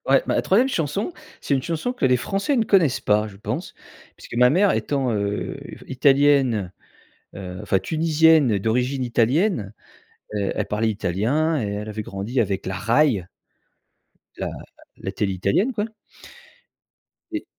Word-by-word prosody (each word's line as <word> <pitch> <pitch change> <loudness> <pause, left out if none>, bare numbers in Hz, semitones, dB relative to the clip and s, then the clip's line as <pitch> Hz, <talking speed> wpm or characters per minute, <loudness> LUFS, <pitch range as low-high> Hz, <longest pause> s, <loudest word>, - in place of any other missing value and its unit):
Ouais, - - +5
ma - - +1
3e 230 +8 +3
chanson, 195 - -2 0.3
c'est - - -1
une 135 - +1
chanson 170 - -2
que 250 - -1
les 125 -1 +4
Français 195 - -1
ne 235 - +3
connaissent 175 -12 +3
pas, 105 +1 +1
je 100 -2 -12
pense, 105 - -5 0.4
puisque - - -10
ma 125 +1 +5
mère 190 +8 +4
étant, 135 -4 -1
heu, 100 -1 -2 0.3
italienne, 135 - +3 0.7
heu, 90 -2 -7
enfin, 95 - +1
tunisienne 160 - +3
d'origine 125 +6 0
italienne, 120 - +1 0.6
heu, 100 -2 -1
elle - - -1
parlait 110 +2 0
italien 115 - 0
et 105 - -2
elle 105 +1 -5
avait 110 0 -4
grandi 105 +5 -2
avec 100 -3 -2
la 95 - -3
Rai. 115 - +2 1.1
La - - -3 0.5
la - - -5
télé 100 -2 -1
italienne, 100 - +1
quoi. 210 -2 -1 1.5
Et 320 -3 -4
125 Hz, 145 wpm, -23 LUFS, 105-160 Hz, 1.5 s, Ouais